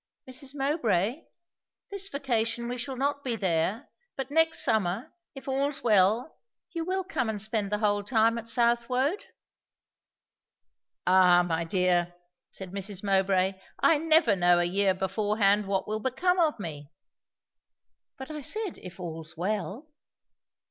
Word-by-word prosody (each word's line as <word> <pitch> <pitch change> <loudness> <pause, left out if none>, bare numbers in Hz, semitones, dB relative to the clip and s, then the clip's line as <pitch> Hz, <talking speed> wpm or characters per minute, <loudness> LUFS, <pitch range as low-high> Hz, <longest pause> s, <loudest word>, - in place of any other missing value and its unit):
"Mrs. 265 +2 -6
Mowbray 270 - 0 0.7
this 395 0 -1
vacation 235 - -1
we 245 +1 -4
shall 260 +2 -4
not 280 +2 -1
be 245 -3 -1
there 190 - -1 0.2
but 270 0 -5
next 325 +1 +3
summer, 200 +1 0 0.2
if 270 - -11
all's 275 +2 -1
well, 215 +5 +2 0.3
you 335 -1 -3
will 375 +2 -2
come 290 - -2
and 215 -1 -3
spend 215 -1 -1
the 210 - +1
whole 205 -1 +1
time 230 +1 +2
at 230 - -9
Southwode?" 245 - +1 1.8
"Ah, 180 -1 +5
my 165 -1 -1
dear," 175 -1 +1 0.3
said 190 -2 -9
Mrs. 195 0 -4
Mowbray, 190 -1 +1 0.2
"I 315 - +3
never 315 - +4
know 175 -1 +4
a 175 - +2
year 190 +1 +2
beforehand 205 +1 +1
what 195 -1 -1
will 215 +1 -2
become 360 - 0
of 315 -7 +2
me!" 150 -6 -7 1.3
"But 265 +3 -8
I 305 -1 -6
said, 425 +6 -1
if 180 0 -11
all's 165 -3 -6
well?" 205 - -3
220 Hz, 140 wpm, -28 LUFS, 190-270 Hz, 1.8 s, Ah